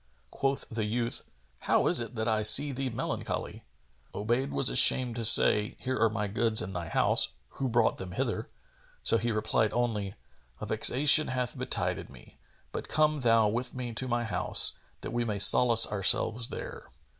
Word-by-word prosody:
Quoth 135 Hz, 0 st, -3 dB
the 110 Hz, -1 st, -5 dB
youth, 115 Hz, +2 st, -4 dB, 0.4 s
"How -, -, 0 dB
is -, -, +6 dB
it 115 Hz, 0 st, -7 dB
that 110 Hz, 0 st, -4 dB
I 110 Hz, -1 st, 0 dB
see 135 Hz, +7 st, +6 dB
thee 135 Hz, 0 st, -4 dB
melancholy?" 115 Hz, -, -6 dB, 0.5 s
Obayd 120 Hz, +6 st, -2 dB
was 135 Hz, -, 0 dB
ashamed 125 Hz, -3 st, +4 dB
to 115 Hz, -, -4 dB
say, 105 Hz, -1 st, +3 dB
"Here 130 Hz, 0 st, -5 dB
are 115 Hz, 0 st, +2 dB
my 105 Hz, -1 st, -4 dB
goods 110 Hz, +1 st, 0 dB
in 95 Hz, -, -5 dB
thy 85 Hz, -2 st, -6 dB
house: -, -, +2 dB, 0.2 s
who 135 Hz, -2 st, -5 dB
brought 120 Hz, -1 st, 0 dB
them 90 Hz, -1 st, -9 dB
hither?"; -, -, -4 dB, 0.5 s
so 115 Hz, -, +3 dB
he 120 Hz, 0 st, -3 dB
replied 110 Hz, 0 st, -1 dB
only, 105 Hz, -5 st, -3 dB, 0.4 s
"A -, -, -7 dB
vexation 150 Hz, +3 st, +4 dB
hath 125 Hz, -1 st, -4 dB
betided -, -, -4 dB
me; -, -, -18 dB, 0.3 s
but -, -, -7 dB
come 155 Hz, 0 st, 0 dB
thou 115 Hz, -3 st, +2 dB
with 120 Hz, +5 st, -4 dB
me 125 Hz, -2 st, -6 dB
to 130 Hz, +3 st, -3 dB
my 120 Hz, -1 st, -2 dB
house, 110 Hz, -, +1 dB, 0.3 s
that -, -, -7 dB
we 120 Hz, 0 st, -2 dB
may 105 Hz, -3 st, -4 dB
solace 115 Hz, +3 st, +5 dB
ourselves 110 Hz, +3 st, +1 dB
there." -, -, -9 dB
115 Hz, 175 wpm, -27 LUFS, 110-125 Hz, 0.5 s, is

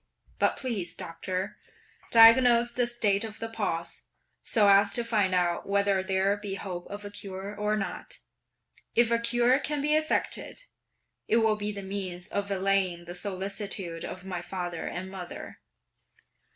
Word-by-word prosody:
But -, -, +2 dB
please, 225 Hz, -9 st, -3 dB
Doctor, 185 Hz, +4 st, -5 dB, 0.5 s
diagnose 235 Hz, +1 st, +7 dB
the 245 Hz, 0 st, +2 dB
state 215 Hz, -4 st, +1 dB
of 220 Hz, -1 st, -6 dB
the 225 Hz, -, -4 dB
pulse, 190 Hz, -7 st, -3 dB, 0.4 s
so 210 Hz, -3 st, +4 dB
as 200 Hz, 0 st, +5 dB
to 240 Hz, -, +2 dB
find 210 Hz, -5 st, +1 dB
out 175 Hz, +1 st, 0 dB
whether 200 Hz, -1 st, +2 dB
there 190 Hz, +1 st, +1 dB
be 205 Hz, -2 st, -4 dB
hope 180 Hz, -3 st, -6 dB
of 205 Hz, 0 st, -8 dB
a 205 Hz, -, -6 dB
cure 195 Hz, 0 st, -7 dB
or 210 Hz, +1 st, 0 dB
not; 195 Hz, -, -5 dB, 0.8 s
if 235 Hz, 0 st, +4 dB
a 235 Hz, -, +3 dB
cure 240 Hz, +3 st, +3 dB
can 295 Hz, 0 st, -2 dB
be 300 Hz, +2 st, +1 dB
effected, 310 Hz, +9 st, -1 dB, 0.6 s
it 225 Hz, -, +3 dB
will 220 Hz, -2 st, +3 dB
be 210 Hz, 0 st, -3 dB
the 200 Hz, -1 st, -7 dB
means 190 Hz, -2 st, -4 dB
of 200 Hz, -1 st, -3 dB
allaying 190 Hz, -3 st, +1 dB
the 175 Hz, -, -7 dB
solicitude 195 Hz, -2 st, -2 dB
of 185 Hz, 0 st, -7 dB
my 180 Hz, -2 st, -4 dB
father 175 Hz, -1 st, -4 dB
and 185 Hz, +2 st, -5 dB
mother." 180 Hz, -2 st, -8 dB
200 Hz, 155 wpm, -28 LUFS, 185-225 Hz, 0.8 s, diagnose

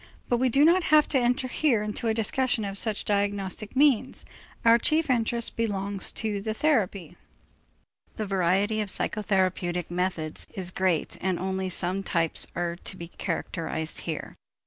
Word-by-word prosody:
But 240 Hz, -, +3 dB
we 255 Hz, +1 st, +2 dB
do 275 Hz, +5 st, +5 dB
not 345 Hz, +1 st, +4 dB
have 305 Hz, 0 st, +5 dB
to 270 Hz, -, +3 dB
enter 250 Hz, +2 st, +1 dB
here 250 Hz, -5 st, +1 dB
into 210 Hz, +2 st, -3 dB
a 220 Hz, -, +2 dB
discussion 230 Hz, 0 st, +1 dB
of 195 Hz, 0 st, -4 dB
such 210 Hz, 0 st, 0 dB
diagnostic 205 Hz, +1 st, -1 dB
means; 265 Hz, -2 st, +3 dB, 0.4 s
our 230 Hz, +1 st, +7 dB
chief 310 Hz, +2 st, +2 dB
interest 235 Hz, -1 st, 0 dB
belongs 200 Hz, -3 st, -2 dB
to 210 Hz, -2 st, -1 dB
the 215 Hz, +1 st, -3 dB
therapy. 200 Hz, -, 0 dB, 1.0 s
The 215 Hz, -, -3 dB
variety 195 Hz, +3 st, +1 dB
of 210 Hz, -, -2 dB
the 190 Hz, -, -1 dB
psychotherapeutic 185 Hz, -4 st, -1 dB
methods 175 Hz, -3 st, -2 dB
is 185 Hz, -2 st, -4 dB
great 185 Hz, -4 st, 0 dB
and 185 Hz, -2 st, 0 dB
only 190 Hz, +1 st, -2 dB
some 185 Hz, +1 st, -1 dB
types 165 Hz, -4 st, 0 dB
are 175 Hz, 0 st, -2 dB
to 190 Hz, -, -9 dB
be 170 Hz, -1 st, -8 dB
characterized 160 Hz, -3 st, -3 dB
here. 160 Hz, -3 st, -5 dB
200 Hz, 160 wpm, -27 LUFS, 185-235 Hz, 1.0 s, our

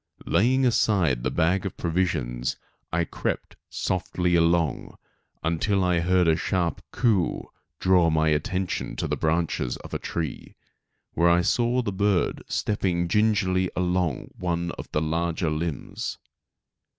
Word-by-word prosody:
Laying 130 Hz, +5 st, +3 dB
aside 95 Hz, -, +2 dB
the 65 Hz, -, 0 dB
bag 90 Hz, +6 st, +1 dB
of 95 Hz, -, -5 dB
provisions 80 Hz, -9 st, -1 dB, 0.3 s
I 85 Hz, +1 st, +1 dB
crept -, -, -4 dB
softly 90 Hz, -1 st, -1 dB
along, 85 Hz, -2 st, +1 dB, 0.5 s
until 90 Hz, +4 st, +1 dB
a 90 Hz, -1 st, +3 dB
sharp 85 Hz, 0 st, -1 dB
"coo 105 Hz, -7 st, +3 dB
o -, -, -1 dB
o" -, -, -10 dB, 0.3 s
drew 90 Hz, -3 st, +4 dB
my 80 Hz, 0 st, +2 dB
attention 90 Hz, +5 st, -1 dB
to -, -, -2 dB
the -, -, -1 dB
branches 80 Hz, -6 st, 0 dB
of -, -, -12 dB
a -, -, -1 dB
tree, 80 Hz, -4 st, -5 dB, 0.6 s
where 85 Hz, +1 st, +3 dB
I 85 Hz, +1 st, +4 dB
saw 120 Hz, +5 st, +2 dB
the 105 Hz, -, -2 dB
bird 100 Hz, -1 st, +1 dB
stepping 90 Hz, -5 st, 0 dB
gingerly 95 Hz, -3 st, +2 dB
along 90 Hz, -4 st, 0 dB
one 85 Hz, -1 st, -1 dB
of -, -, -9 dB
the 75 Hz, -, 0 dB
larger 85 Hz, +1 st, -1 dB
limbs. 80 Hz, 0 st, -3 dB
85 Hz, 135 wpm, -25 LUFS, 80-95 Hz, 0.6 s, drew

